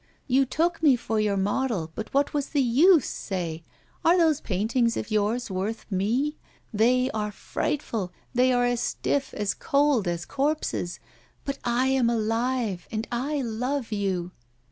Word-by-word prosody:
You 265 0 +3
took 335 +6 0
me 290 -5 +6
for 225 -2 -2
your 210 -2 +1
model, 200 -4 -1
but 220 - -6
what 280 +1 +1
was 285 -2 -1
the 290 - 0
use, 295 +6 +5
say? 170 -4 -4 0.4
Are 340 +2 +5
those 320 -4 +3
paintings 230 +4 0
of - - -4
yours 215 +2 0
worth 195 +4 -3
me? 240 +11 0 0.3
They 250 +4 +3
are 210 -1 -2
frightful, 230 - -3 0.2
they 255 +1 +4
are 245 -1 +3
as 245 -1 0
stiff, 280 -1 -1
as 205 -1 0
cold 280 - +2
as 175 0 -2
corpses. 280 - -1 0.5
But 275 0 -3
I 240 +2 +1
am 265 -3 +3
alive, 225 -3 -1
and 220 +1 -3
I 275 +4 -1
love 250 +2 -2
you! 190 -4 -1
240 Hz, 155 wpm, -26 LUFS, 210-275 Hz, 0.5 s, me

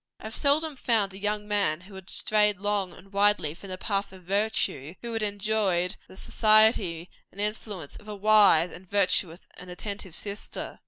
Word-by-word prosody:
I - - -17
have 220 - -6
seldom 295 +3 +1
found 215 -6 +1
a - - -9
young 210 0 -2
man 200 -6 +1
who 195 +2 -15
had 190 -1 -11
strayed 210 -2 +2
long 200 -2 -1
and 195 +3 -16
widely 200 -6 +2
from 190 +4 -12
the 185 - -4
path 200 0 -2
of 190 -1 -14
virtue, 190 -6 -1
who 235 -1 -5
had 225 - -2
enjoyed 200 -3 0
the 190 - -15
society 215 -7 +3 0.2
and 195 - -16
influence 205 -6 -4
of 210 - -15
a 210 - -6
wise, 200 -5 +5
and 180 +1 -12
virtuous, 185 -3 +1
and 180 - -10
attentive 190 -1 -6
sister. 205 +2 -6
200 Hz, 180 wpm, -27 LUFS, 185-210 Hz, 0.2 s, wise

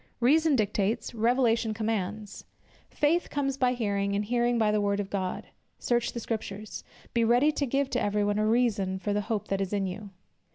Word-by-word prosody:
Reason 300 +5 +4
dictates, 210 0 0
Revelation 230 -1 +2
commands; 210 -1 -3 0.5
"Faith 325 +4 +1
comes 275 -2 -1
by 255 -2 +2
hearing, 200 -4 -1
and 205 +1 -1
hearing 240 +1 +1
by 215 -2 +3
the 210 0 +1
word 200 0 0
of 200 -1 -4
God." 185 -2 -3 0.3
"Search 240 -1 0
the 235 - -4
Scriptures," 215 -2 -5 0.3
"Be 235 - +2
ready 245 +6 +4
to 290 -2 -2
give 275 +2 +1
to 250 - 0
every 205 0 +1
one 205 0 0
a 215 - +2
reason 210 -5 +1
of 205 - +1
the 205 - +1
hope 210 0 -3
that 195 0 0
is 195 +1 -3
in 200 -1 0
you." 200 +3 -6
220 Hz, 195 wpm, -28 LUFS, 205-245 Hz, 0.5 s, Reason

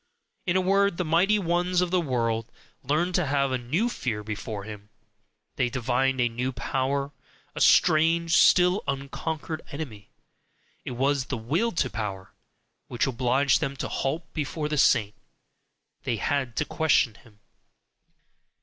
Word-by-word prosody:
In 175 - +1
a 185 - +4
word, 195 0 +2
the 180 - -1
mighty 180 +7 +3
ones 180 -1 0
of 180 -1 0
the 185 -1 +2
world 115 -5 -1 0.3
learned 155 +7 0
to 175 -3 +1
have 140 -1 +1
a 130 - 0
new 155 - 0
fear 115 - -3
before 105 -1 -5
him, 105 -1 -10 0.7
they 125 -2 +1
divined 130 +1 0
a 120 - +3
new 120 +3 -3
power, 135 +2 -2 0.4
a - - -5
strange, 165 +1 +4
still 180 +2 +5
unconquered 150 +3 -4
enemy: 130 -9 -7 0.7
it - - -5
was 135 0 +1
the 135 - -3
"Will 160 - 0
to 140 - +1
Power" 100 -4 -5 0.6
which 120 - 0
obliged 130 +1 +2
them 140 -3 -2
to - - -4
halt 155 +5 -2
before 150 +1 -3
the 150 - -2
saint. 105 -6 +3 0.9
They 115 - -1
had 130 0 -1
to 150 - 0
question 155 -8 +2
him. 105 -2 -21
140 Hz, 150 wpm, -26 LUFS, 120-165 Hz, 0.9 s, still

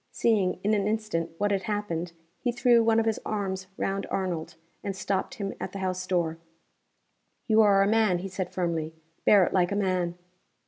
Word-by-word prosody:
Seeing 205 -6 +2
in 210 +2 +2
an 205 -1 +1
instant 210 -7 -1
what 205 +2 +1
had 195 -1 +1
happened, 195 -6 -3 0.3
he 245 - 0
threw 240 -1 +4
one 225 0 +4
of 225 - +1
his 225 -1 0
arms 190 -3 -3
round 195 0 -2
Arnold, 180 -4 -3 0.3
and 200 -1 -3
stopped 195 +6 -2
him 200 -4 -4
at - - -5
the - - -5
house 185 -1 -2
door. 170 -3 0 1.1
"You 220 -1 +5
are 200 -2 +5
a - - +2
man," 215 -4 +3
he 185 +2 -5
said, 185 -1 -4
firmly. 165 -3 -2 0.3
"Bear 200 -2 +7
it - - -3
like 180 -1 +2
a - - 0
man." 185 -3 0
195 Hz, 190 wpm, -27 LUFS, 180-215 Hz, 1.1 s, Bear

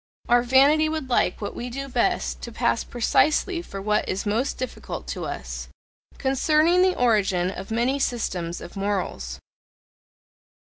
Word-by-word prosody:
Our 240 0 +5
vanity 280 +5 +4
would 310 -5 -4
like 200 -5 +1
what 205 - -4
we 245 - -5
do 275 +3 -5
best 245 -3 0
to 235 - -6
pass 235 0 0
precisely 305 - +1
for 195 - -8
what 210 +2 0
is 190 - -2
most 225 +6 0
difficult 255 -1 -6
to - - -4
us. - - -5 0.5
Concerning 310 +6 +3
the 370 0 +3
origin 195 -7 +2
of 190 0 -8
many 240 +5 +1
systems 180 -10 -2
of 175 - -10
morals. 190 - -2
240 Hz, 145 wpm, -24 LUFS, 195-275 Hz, 0.5 s, Our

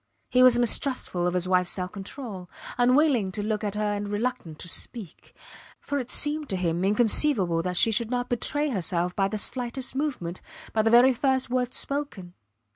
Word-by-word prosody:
He 250 - +4
was 255 -1 +7
mistrustful 240 -6 0
of 180 - -1
his 180 0 0
wifes 180 -1 +2
self 180 0 -3
control, 200 -2 -8 0.3
unwilling 245 -4 +3
to 205 - -3
look 215 0 -2
at 205 -1 -2
her 210 0 -1
and 205 0 -3
reluctant 205 -7 -3
to 170 - -6
speak, 195 +1 -7 0.4
for 285 - -3
it 250 -2 -6
seemed 295 0 +1
to 190 - -1
him 175 -1 -1
inconceivable 205 - +2
that 180 +1 -3
she 225 - +4
should 225 +1 +2
not 245 0 -2
betray 290 +5 0
herself 180 -3 -1
by 195 -1 +1
the 215 +2 -4
slightest 245 +4 -3
movement, 255 - -3 0.3
by 220 - +2
the 225 - +2
very 245 +3 +6
first 260 0 0
word 250 0 -1
spoken. 275 -11 -4
220 Hz, 185 wpm, -26 LUFS, 185-255 Hz, 0.4 s, was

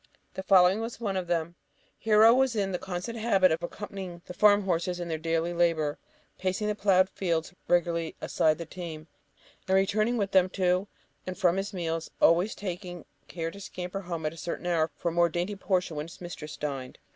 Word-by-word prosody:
The - - -4
following 190 +1 +5
was 230 0 -5
one 205 -5 -2
of 185 -2 -2
them: 170 -1 -1 0.5
Hero 220 +1 +6
was 260 -1 +2
in 195 -2 0
the 180 - -2
constant 190 +5 -5
habit 195 -5 +4
of 160 +1 0
accompanying 185 -1 -7
the - - -8
farm 205 +2 +5
horses 180 -1 -1
in 175 -1 -4
their 160 -1 -2
daily 165 +1 -1
labour, 165 -4 +1 0.4
pacing 190 +3 -1
the 210 - +1
ploughed 195 -3 +3
field 170 -4 -2 0.2
regularly 170 -2 +1
aside 155 -1 +1
the 170 - -6
team, 160 -2 -7 0.6
and 190 - +3
returning 215 +5 +2
with 200 -2 -1
them 185 -1 +4
to 185 +1 +1 0.4
and 185 - -4
from 180 -2 +3
his 195 +1 -2
meals, 165 -4 -3
always 175 +6 +4
taking 180 -3 -6 0.2
care 165 -1 -4
to 200 - -11
scamper 185 +1 -5
home 170 -4 -5
at 155 - -1
a - - -13
certain 165 +3 -5
hour 165 -2 +1
for 170 - -1
a - - -4
more 170 +1 +3
dainty 175 +5 -2
portion 185 -4 -1
when 150 +1 -4
his 170 - -13
mistress 160 -4 -8
dined. 135 -4 -5
180 Hz, 200 wpm, -28 LUFS, 165-195 Hz, 0.6 s, Hero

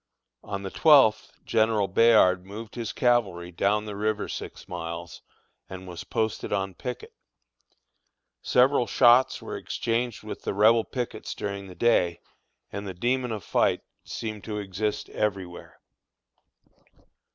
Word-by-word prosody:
On 100 -1 -5
the 95 - -5
twelfth 140 -9 +5
General 110 -2 +2
Bayard 95 -4 +5
moved 105 +3 -9
his 115 -3 -4
cavalry 100 -8 +1
down 100 +4 +1
the 105 -1 -6
river 105 +1 -1
six - - -7
miles, 85 -1 -6 0.5
and 95 0 -8
was 90 -2 -7
posted 110 -2 -2
on 95 -1 -1
picket. 125 +6 -7 1.3
Several 125 0 +3
shots 125 +1 +4
were - - -5
exchanged 120 -1 -2
with 110 - -7
the - - -3
Rebel 110 +2 +5
pickets 120 -4 -5
during 100 -1 -5
the 90 - -11
day, 90 -7 +2 0.5
and 100 0 -5
the 95 - -6
demon 125 +5 0
of 105 -4 -4
fight - - +1 0.2
seemed 110 -2 -6
to 105 -2 -4
exist 105 +1 -3
everywhere. 95 -4 -4
105 Hz, 130 wpm, -26 LUFS, 95-115 Hz, 1.3 s, twelfth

